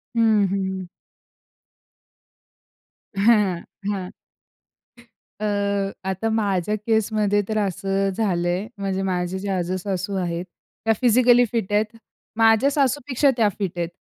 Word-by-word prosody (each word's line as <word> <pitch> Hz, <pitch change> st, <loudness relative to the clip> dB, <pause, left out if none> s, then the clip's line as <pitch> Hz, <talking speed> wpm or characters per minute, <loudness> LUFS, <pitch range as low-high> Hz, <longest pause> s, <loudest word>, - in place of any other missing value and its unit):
हं, 220 Hz, -3 st, +4 dB
हं. 190 Hz, -2 st, -2 dB, 2.3 s
हं, 200 Hz, -3 st, +3 dB, 0.3 s
हं. 190 Hz, -3 st, -2 dB, 1.3 s
अ, 215 Hz, -, -2 dB, 0.6 s
आता 190 Hz, +4 st, -1 dB
माझ्या 210 Hz, -3 st, 0 dB
केसमध्ये 215 Hz, -2 st, +2 dB
तर 220 Hz, -, -1 dB
असं 195 Hz, +1 st, -1 dB
झालंय. 180 Hz, -2 st, 0 dB
म्हणजे 195 Hz, -1 st, -2 dB
माझ्या 180 Hz, 0 st, -2 dB
ज्या 195 Hz, -1 st, -2 dB
आजेसासू 185 Hz, +2 st, -2 dB
आहेत 175 Hz, -1 st, -2 dB, 0.4 s
त्या 225 Hz, -, +4 dB
फिजिकली 245 Hz, 0 st, +5 dB
फिट 225 Hz, -5 st, -2 dB
आहेत. 210 Hz, +1 st, +3 dB, 0.5 s
माझ्या 225 Hz, +4 st, +5 dB
सासूपेक्षा 280 Hz, -1 st, +1 dB
त्या 215 Hz, -3 st, +4 dB
फिट 190 Hz, -4 st, -3 dB
आहेत. 170 Hz, -1 st, -1 dB
200 Hz, 105 wpm, -23 LUFS, 185-225 Hz, 2.3 s, फिजिकली